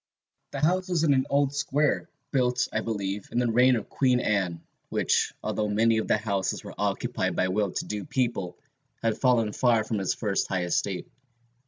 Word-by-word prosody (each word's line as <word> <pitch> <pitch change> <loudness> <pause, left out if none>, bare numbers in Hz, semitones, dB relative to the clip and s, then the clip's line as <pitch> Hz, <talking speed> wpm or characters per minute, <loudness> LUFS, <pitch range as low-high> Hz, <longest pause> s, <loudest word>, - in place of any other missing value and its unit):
"The 140 - -5
house 185 +4 +1
was 170 -3 +1
in 150 -3 +4
an 130 -1 +1
old 140 0 +2
square, 145 +1 0 0.2
built, 125 -2 +1
I 110 - 0
believe, 100 -3 -3
in - - -3
the 120 -1 +2
reign 125 +2 +5
of 110 - -4
Queen 125 -2 +2
Anne, 95 -7 -1 0.3
which, - - +1
although 105 - -1
many 110 +2 +3
of - - -3
the - - +3
houses 100 -3 -2
were - - -8
occupied - - -1
by 95 - +1
well 100 +1 +1
to - - -3
do 105 -1 -4
people, 120 -10 -2 0.5
had 115 -1 0
fallen 115 -5 +2
far 115 -2 +3
from 110 -1 -2
its 95 - 0
first 105 -4 -1
high 95 -2 -1
estate. 90 +2 -1
115 Hz, 190 wpm, -27 LUFS, 100-130 Hz, 0.5 s, reign